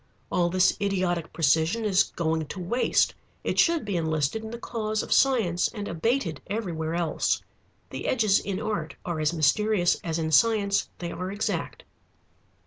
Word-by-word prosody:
All 175 -2 +2
this 185 +1 +3
idiotic 185 -4 -1
precision 165 +8 +2
is 195 -2 +4
going 160 -2 -2
to 190 - -7
waste. 185 +8 +1 0.3
It - - -1
should 335 -5 +3
be 200 -2 -2
enlisted 160 +5 -1
in 220 - -6
the 235 - -6
cause 215 -2 -2
of - - 0
science 225 -11 +3
and 205 -3 -6
abated 170 - -1
everywhere 170 -6 -3
else. 170 -2 0 0.5
The - - -5
edges 215 -5 +3
in 195 -1 -4
art 210 -8 -3
are 170 -3 -2
as 155 0 +1
mysterious 175 +4 +2
as 165 -1 -2
in 160 -1 -2
science 200 +3 +3
they 170 -1 -5
are 185 +1 -4
exact. 210 - -3
185 Hz, 160 wpm, -26 LUFS, 165-215 Hz, 0.5 s, is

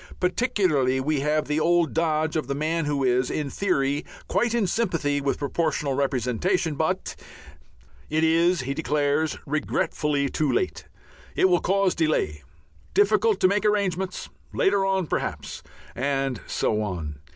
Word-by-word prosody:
Particularly 180 - +1
we 145 +2 0
have 150 +2 0
the 150 +1 0
old 170 0 +2
dodge 160 -1 0
of 155 - -1
the 140 - -2
man 160 +2 -1
who 145 -2 0
is 125 0 +2
"in 145 -3 -3
theory 145 -7 0 0.2
quite 235 0 +1
in 230 -4 +2
sympathy 165 -9 0
with 140 0 0
Proportional 145 -1 -1
Representation, 140 - 0
but 160 +6 -2 0.5
..." - - -29
It 155 +1 +1
is, 165 +1 +3
he 135 +2 -3
declares 150 0 0
regretfully, 150 -1 0
too 145 +1 0
late. 120 - -1 0.5
It 190 - +4
will 175 -1 +3
cause 195 0 +2
delay. 155 - 0 0.5
Difficult 210 0 +3
to - - +6
make 205 +2 +1
arrangements. 190 -3 0 0.3
Later 195 0 +2
on 190 -2 +1
perhaps. - - -4 0.3
And 135 -1 -1
so 105 0 0
on. 85 -8 -4
155 Hz, 145 wpm, -25 LUFS, 140-180 Hz, 0.5 s, to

